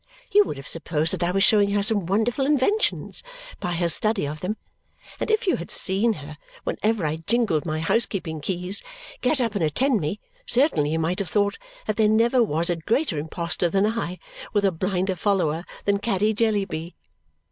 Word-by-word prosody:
You 415 0 +6
would - - -5
have 135 - -9
supposed 165 -1 -1
that 185 - -3
I 175 - +2
was 195 +2 +2
showing 205 -2 +5
her 205 -1 +2
some 205 -5 +1
wonderful 225 +7 +1
inventions, 300 +10 +1 0.4
by 175 - -2
her 170 0 +1
study 210 +3 +1
of 150 +2 -5
them; 200 +7 -3 0.6
and - - -2
if 435 -1 +2
you 365 - +2
had 170 - -7
seen 205 +5 +1
her, 150 -3 -10 0.2
whenever 215 -5 0
I 155 +1 -1
jingled 170 -2 0
my 155 0 -1
housekeeping 165 -4 -1
keys, 180 +4 -2 0.4
get 270 +3 +2
up 230 -4 0
and 200 -5 -1
attend 230 - +2
me, 155 +8 -2 0.3
certainly 235 - +3
you 160 - 0
might 165 +3 0
have 195 -4 -2
thought 205 +1 +1 0.3
that 215 - -2
there 215 -1 +4
never 235 +3 +4
was 170 -6 +1
a 175 - -1
greater 225 - 0
imposter 170 +3 -1
than 195 +4 +2
I 215 -5 -2 0.4
with 205 -2 +2
a 195 - +4
blinder 185 +2 -1
follower 175 -3 0 0.2
than 200 0 +2
Caddy 210 0 +1
Jellyby. 200 -7 -1
195 Hz, 190 wpm, -24 LUFS, 165-220 Hz, 0.6 s, You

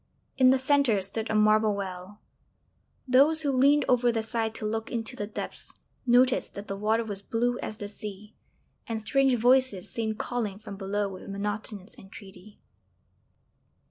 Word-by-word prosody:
In 255 -1 +5
the 265 - +5
centre 265 -5 +2
stood 200 +4 -2
a 215 - 0
marble 215 0 +4
well; 190 +1 -7 0.9
those 290 +5 +4
who 285 - +1
leaned 275 +2 +4
over 245 -1 +3
the 225 -1 -1
side 225 0 -2
to 215 - -5
look 225 +1 -3
into 230 +1 -3
the 205 -4 -4
depths 215 - -6 0.3
noticed 250 +1 +3
that 200 +1 -7
the 195 - -4
water 215 +3 +1
was 205 -3 -6
blue 240 +4 -1
as 215 - -6
the 205 - -6
sea, 210 0 -9 0.5
and 225 -2 -3
strange 265 +4 +2
voices 245 -5 +2
seemed 220 -2 -3
calling 220 -6 -3
from 210 -1 -9
below 200 +1 -2
with 190 0 -9
monotonous 205 0 -5
entreaty. 195 0 -14
220 Hz, 160 wpm, -27 LUFS, 205-245 Hz, 0.9 s, In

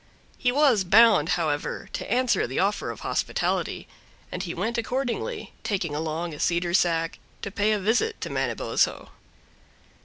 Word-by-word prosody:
He 245 - +2
was 265 -7 +4
bound, 225 +5 +6
however, - - -2
to - - -5
answer 250 - +2
the 130 - -5
offer 200 +2 0
of - - -7
hospitality, - - -1 0.4
and 180 - -4
he 175 -3 -4
went 225 +7 -1
accordingly, 260 - -3
taking 185 -8 -1
along 160 +2 -3
a 145 - -9
cedar 170 0 0
sack, 165 -2 +1 0.2
to 200 - -4
pay 205 +2 +1
a 215 - +2
visit 240 - +1
to - - -4
Manabozho. - - 0
200 Hz, 150 wpm, -25 LUFS, 170-240 Hz, 0.4 s, bound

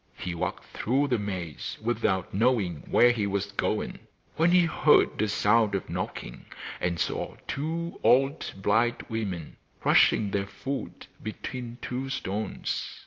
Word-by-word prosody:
He 90 - -4
walked 85 - -3
through 135 +5 0
the 125 -3 +2
maize 90 -7 -4
without 110 -5 0
knowing 105 -6 +2
where 120 - +6
he 110 -4 0
was 100 0 -2
going, 100 - -1 0.4
when 165 +2 +4
he 180 0 +5
heard 155 -2 +4
a 110 - +2
sound 105 0 +3
of 95 - -4
knocking, - - -5 0.3
and 85 -1 -1
saw - - -2
two 165 +4 -3
old 135 +4 +3
blind 115 +5 +2
women 100 -8 -4 0.2
crushing 105 -3 +4
their 100 0 -1
food 135 +6 -5 0.2
between 120 +2 -6
two 130 +2 -3
stones. 105 -4 -3
110 Hz, 140 wpm, -28 LUFS, 100-130 Hz, 0.4 s, where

